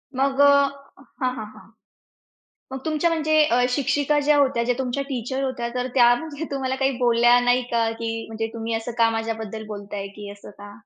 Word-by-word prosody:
मग 270 +1 0
अ - - +8
हां, 275 -2 0
हां, 215 - -6
हां. 215 - -16 1.0
मग 265 - -5
तुमच्या 315 +2 +1
म्हणजे 310 -1 0
अ, 245 -3 +2
शिक्षिका 285 +3 +1
ज्या 300 -1 +5
होत्या 270 -4 +2
ज्या 245 0 0
तुमच्या 265 +2 -2
टीचर 260 +2 -3
होत्या, 255 -3 -3
तर 250 0 -1
त्या 240 -1 +6
म्हणजे 315 +2 -6
तुम्हाला 265 -1 -2
काही 270 - +3
बोलल्या 240 0 +4
नाही 245 +1 +2
का, 230 -1 +1
की 225 0 -4
म्हणजे 225 0 -4
"तुम्ही 230 0 -4
असं 225 +2 -3
का 230 -1 +4
माझ्याबद्दल 220 -1 -5
बोलताय" 205 -1 -6
की 205 -1 -8
असं 205 0 -13
का? 205 0 -10
245 Hz, 190 wpm, -23 LUFS, 225-275 Hz, 1.0 s, अ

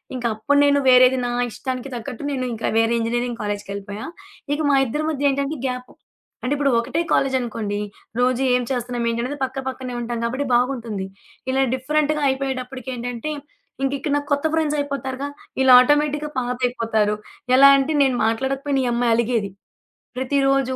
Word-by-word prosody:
ఇంక 245 - -5
అప్పుడు 285 +7 +1
నేను 285 0 +4
వేరేది 255 0 +6
నా 245 - -1 0.2
ఇష్టానికి 260 +2 -5
తగ్గట్టు 240 +3 -6
నేను 255 -2 -2
ఇంక 225 - -8
వేరే 225 +1 +3
ఇంజనీరింగు 240 +1 -2
కాలేజికెళ్ళిపోయా. 205 0 -5 0.5
ఇక 295 - -2
మా 275 - +4
ఇద్దరి 295 +6 -2
మధ్య 285 -2 +1
ఏంటంటే 280 +2 -2
గ్యాప్ 250 0 -5 0.5
అంటే 250 - -2
ఇప్పుడు 280 -2 +1
ఒకటే 315 +8 -1
కాలేజనుకోండి 230 -6 0 0.4
రోజు 255 +1 +2
ఏం 250 - +1
చేస్తున్నాం? 245 -1 -2
ఏంటనేది 245 +5 -3
పక్క 265 +1 -3
పక్కనే 255 -1 -5
ఉంటాం 235 0 -3
కాబట్టి, 260 +4 -2
బాగుంటుంది. 235 -6 -1 0.4
ఇలా 265 +1 +2
డిఫరెంట్‌గా 300 +3 0
అయిపోయేటప్పటికేంటంటే 255 -1 -4 0.5
ఇంక 270 - +1
ఇక్కడ 290 +1 -2
నా - - -1
కొత్త 285 +2 +1
ఫ్రెండ్సయిపోతారుగా. 285 -3 -2 0.3
ఈళ్ళు 260 -1 +7
ఆటోమేటిక్‌గా 295 +2 +2
పాతయిపోతారు. 235 -4 0 0.4
ఎలా 275 +1 +9
అంటే 280 +3 0
నేను 260 -2 +1
మాట్లాడకపోయిన 270 +4 0
ఈ - - 0
అమ్మాయి 235 -1 +2
అలిగేది. 230 -4 0 0.7
ప్రతిరోజు 270 0 +1
255 Hz, 145 wpm, -22 LUFS, 235-275 Hz, 0.7 s, ఎలా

